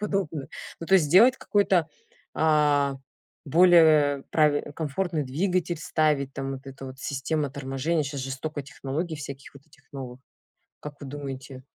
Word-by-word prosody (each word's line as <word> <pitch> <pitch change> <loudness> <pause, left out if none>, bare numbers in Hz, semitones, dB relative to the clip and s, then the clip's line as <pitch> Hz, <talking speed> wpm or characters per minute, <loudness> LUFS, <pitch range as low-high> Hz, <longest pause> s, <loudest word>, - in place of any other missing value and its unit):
подобное. 190 -9 -2 0.3
Ну 165 - -6
то 195 - +4
есть 165 -6 +5
сделать 230 - +6
какой-то, 190 -5 +1 0.5
а, 150 -3 +3 0.5
более 155 -3 +5
прави 150 -1 +2
комфортный 160 +1 -2
двигатель, 175 +4 -1
ставить 150 -3 0
там 135 0 -4
вот 135 - -6
эта 135 0 -9
вот 130 0 -10
система 145 +2 -2
торможения. 140 +3 -2
Щас 140 -1 -5
же 135 +1 -5
столько 145 +2 -5
технологий 150 +5 -4
всяких 140 -2 -9
вот 140 +2 -16
этих 155 - -24
новых. 130 -2 -8 0.6
Как 145 -1 -9
вы 140 - -7
думаете? 135 -2 -7
145 Hz, 150 wpm, -26 LUFS, 135-160 Hz, 0.6 s, сделать